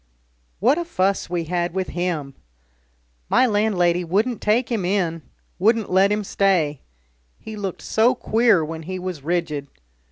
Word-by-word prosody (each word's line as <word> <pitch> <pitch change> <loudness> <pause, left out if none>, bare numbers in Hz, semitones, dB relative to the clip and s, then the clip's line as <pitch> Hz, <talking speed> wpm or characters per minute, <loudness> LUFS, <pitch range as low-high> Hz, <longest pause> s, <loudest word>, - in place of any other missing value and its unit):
What 255 - +3
a - - -1
fuss 200 - -1
we 175 -1 -1
had 175 +1 -2
with 190 -1 -2
him! 170 -6 -3 1.0
My - - +4
landlady 195 -6 +2
wouldn't 210 +8 0
take 230 +3 +1
him 220 -5 0
in, 175 -3 0 0.4
wouldn't 220 +2 +2
let 190 +2 +4
him 210 0 0
stay 180 -8 +1 0.6
he 220 - -9
looked 195 -3 -5
so 235 +4 +3
queer 225 -8 +2
when 160 +1 -6
he 185 +4 -5
was 180 -4 -5
rigid. 155 -2 -2
185 Hz, 150 wpm, -22 LUFS, 170-215 Hz, 1.0 s, My